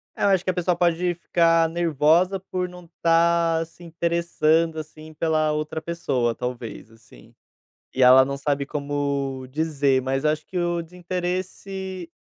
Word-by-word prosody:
É, - - -8
eu - - +5
acho 190 -2 +3
que 185 - -2
a - - -7
pessoa 180 0 0
pode 175 0 +1
ficar 165 -1 +3
nervosa 170 +3 +2
por 185 -1 -4
não 180 -1 -12
estar 165 0 +2
se 175 +2 -18
interessando, 165 -1 +1
assim, 155 0 -9
pela 155 -1 0
outra 155 +1 -3
pessoa, 135 -8 -1
talvez, 120 -3 -6
assim, 110 - -19 0.6
e 130 - -1
ela 130 +1 +8
não 140 +1 -4
sabe 140 0 -1
como 140 -2 -3
dizer. 145 -3 +1
Mas 135 +2 -2
acho 155 0 0
que 185 - -5
o 175 -1 0
desinteresse 180 +1 -5
165 Hz, 150 wpm, -24 LUFS, 140-175 Hz, 0.6 s, ela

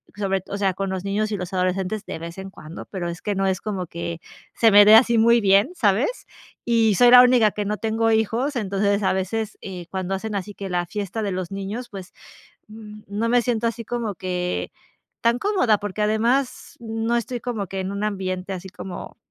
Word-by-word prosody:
sobre 195 -2 -1
todo, 195 - -7
o - - -3
sea, 195 -2 +1
con 195 +1 -3
los 190 -1 -3
niños 210 +2 -1
y 205 - -1
los 180 0 -6
adolescentes 185 +3 -1
de - - -5
vez 170 +2 -8
en 190 0 -7
cuando, 160 -1 -10
pero, 180 -3 -5
es 170 +1 -7
que, 205 -2 -2
no 195 0 0
es 190 -2 -1
como 195 -4 -3
que, 170 0 -5 0.4
se 225 -2 +4
me 205 0 +8
de 215 - +9
así 235 0 +5
muy 235 +1 +5
bien, 200 - +4
¿sabes? 230 - +1 0.4
Y 225 -3 +3
soy 245 +4 +6
la 250 0 +11
única 245 -4 +4
que 210 +1 -4
no 210 +1 -2
tengo 225 +1 0
hijos, 225 +6 0
entonces 200 -2 0
a 190 - +2
veces, 215 +3 -3
eh, 180 -3 -7
cuando 190 0 -2
hacen 215 +3 -5
así 200 +1 -4
que 195 -1 -6
la 175 -1 -1
fiesta 205 +2 -4
de 200 - -2
los 185 -1 -4
niños, 200 +5 -5
pues, 195 -3 -9 0.6
mm, 215 -1 -11
no 210 +3 -1
me 245 0 +4
siento 235 -1 0
así 230 0 -3
como 230 -2 -3
que 180 0 -3 0.5
tan 235 +1 +3
cómoda, 310 - +2
porque, 205 +1 -4
además, 235 +5 0
no 225 +1 -1
estoy 240 +1 -3
como 225 -5 -3
que 195 +1 -4
en 190 - -3
un 200 +1 -3
ambiente 190 -2 -3
así 185 0 -6
como, 185 0 -8
205 Hz, 220 wpm, -23 LUFS, 190-225 Hz, 0.6 s, la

